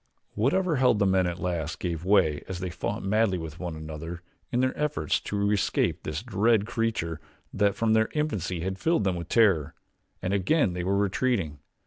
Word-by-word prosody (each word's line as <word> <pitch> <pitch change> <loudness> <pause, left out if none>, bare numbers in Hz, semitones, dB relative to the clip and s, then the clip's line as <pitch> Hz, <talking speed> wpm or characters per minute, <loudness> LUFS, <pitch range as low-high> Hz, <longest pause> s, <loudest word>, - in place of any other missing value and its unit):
Whatever 155 - +1
held 125 -4 +4
the 100 - +2
men 95 -1 +3
at 90 0 -3
last 85 -3 -3
gave 85 -3 -3
way 90 -6 +3
as 95 -2 -5
they 90 -1 -4
fought - - -3
madly 100 -1 +2
with 80 -1 -7
one 85 -3 -4
another 80 +2 -7 0.3
in 125 - +1
their 130 0 +1
efforts 150 0 0
to 100 0 -1
escape 105 -2 +1
this - - -4
dread 105 +1 +2
creature 110 -9 -2 0.3
that 100 -1 +2
from 115 -1 +2
their 110 0 +3
infancy 100 - -1
had 95 +2 -3
filled 165 -7 +2
them 95 -2 +1
with 85 -1 -6
terror, 100 - +3 0.4
and 95 +2 -2
again 100 - +2
they 90 0 -3
were 95 +2 +1
retreating. 100 - 0
95 Hz, 185 wpm, -27 LUFS, 85-115 Hz, 0.4 s, held